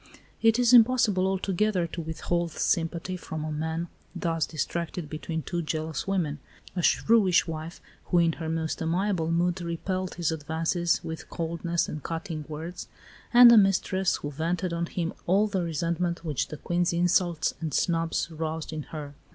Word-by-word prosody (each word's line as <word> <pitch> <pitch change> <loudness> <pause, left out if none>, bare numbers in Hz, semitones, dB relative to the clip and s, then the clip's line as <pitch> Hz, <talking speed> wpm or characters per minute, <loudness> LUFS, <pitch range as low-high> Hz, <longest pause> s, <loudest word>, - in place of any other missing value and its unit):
It 225 0 +5
is 245 0 +4
impossible 225 -6 +5
altogether 190 0 0
to 170 +1 -5
withhold 165 +1 -2
sympathy 170 +2 -1
from 160 -3 -6
a 155 - -3
man 160 +2 -2 0.3
thus 165 -2 -1
distracted 165 +2 -3
between 160 +1 -4
two 175 -2 -2
jealous 155 +1 -3
women 165 -7 -1 0.4
a 180 - 0
shrewish 195 -1 +4
wife, 165 0 -6 0.3
who 175 - +1
in 170 -1 +4
her 160 -1 -5
most 160 -1 -2
amiable 170 0 0
mood 175 +2 +1
repelled 185 +2 -3
his 170 -2 0
advances 160 +2 0
with 160 0 -6
coldness 170 0 -1
and 150 - -5
cutting 165 0 -5
words, 165 +3 -6 0.4
and 245 0 +10
a 235 - +8
mistress 190 -1 +2
who 145 - -5
vented 170 +4 -2
on 170 0 -1
him 170 -1 -3
all 195 +4 +4
the 200 -3 -1
resentment 170 +1 -2
which 150 -5 -1
the 155 - -7
Queen's 175 +2 0
insults 175 -1 +2
and 160 -2 -2
snubs 165 +2 0
roused 160 0 -4
in 155 - -3
her. 150 -3 -7
170 Hz, 160 wpm, -27 LUFS, 160-185 Hz, 0.4 s, and